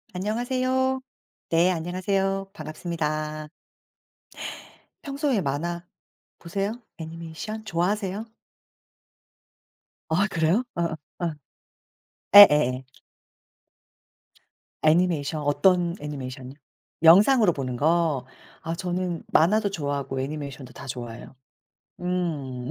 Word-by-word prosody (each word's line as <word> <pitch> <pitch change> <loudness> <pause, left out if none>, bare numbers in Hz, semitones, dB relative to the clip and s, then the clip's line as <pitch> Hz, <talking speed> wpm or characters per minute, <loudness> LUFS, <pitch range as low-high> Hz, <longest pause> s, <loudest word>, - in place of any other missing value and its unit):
안녕하세요. 255 +6 0 0.5
네 170 +2 +4
안녕하세요. 195 +3 -1
반갑습니다. 155 -2 -4 1.5
평소에 280 -6 0
만화 170 +4 -3 0.6
보세요? 200 +7 -3 0.2
애니메이션 165 +7 -7
좋아하세요? 200 +3 -1 1.8
아 180 +6 +2
그래요? 170 +6 +2
아 170 -2 -1 0.2
아. 170 -2 -1 1.0
예예예. 150 -10 +8 2.0
애니메이션 155 -2 +2
어떤 175 +3 +3
애니메이션이요? 135 -2 -7 0.5
영상으로 200 +4 +7
보는 130 -4 -3
거. 155 -2 +2 0.4
아 165 0 -3
저는 180 -1 -3
만화도 200 +5 +3
좋아하고 140 -5 -2
애니메이션도 140 -2 -6
다 125 - -10
좋아해요. 120 0 -7 0.7
음 150 -9 -2
170 Hz, 225 characters per minute, -25 LUFS, 150-195 Hz, 2.0 s, 예예예